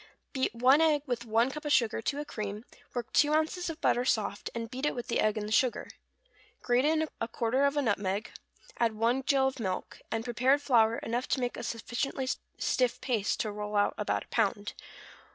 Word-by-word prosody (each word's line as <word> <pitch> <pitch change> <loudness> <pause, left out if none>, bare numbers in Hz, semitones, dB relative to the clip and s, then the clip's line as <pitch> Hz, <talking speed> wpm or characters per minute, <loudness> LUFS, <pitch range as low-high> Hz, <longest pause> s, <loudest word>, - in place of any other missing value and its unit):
= - - -48
Beat 260 -3 -1
one 260 +6 +5
egg 305 -3 +3
with 245 -4 -3
one 230 +3 +2
cup 300 +2 -7
of 295 - -2
sugar 230 -5 +3
to 280 +5 -2
a 295 - -4
cream, 210 -3 -5 0.3
work 240 -2 -4
two 295 0 +4
ounces 320 +3 0
of 325 0 -6
butter 245 - +2
soft, 215 -4 -1
and 230 0 -3
beat 260 +1 -6
it - - -1
with 245 - -6
the - - +1
egg 215 0 +2
and 210 0 -2
sugar, 250 0 +1 0.7
grate 245 +2 +2
in 315 +1 +2 0.2
quarter 250 +5 +1
of 280 +1 +1
a 290 - +2
nutmeg, 205 -1 -1 0.5
add 230 -2 +2
one 235 +4 +1
gill 270 0 +2
of 265 -1 -4
milk, 185 -3 -4
and 225 +1 -2
prepared 255 +4 +3
flour 230 -5 +3
enough 240 +2 -2
to - - 0
make 245 -1 -2
a - - -6
sufficiently 240 +3 -3 0.3
stiff 250 -2 +1
paste 225 -6 -1
to 215 - -2
roll 210 0 -5
out 205 0 +3
about - - -1
a - - -23
pound. - - 0
245 Hz, 205 wpm, -30 LUFS, 225-275 Hz, 0.7 s, one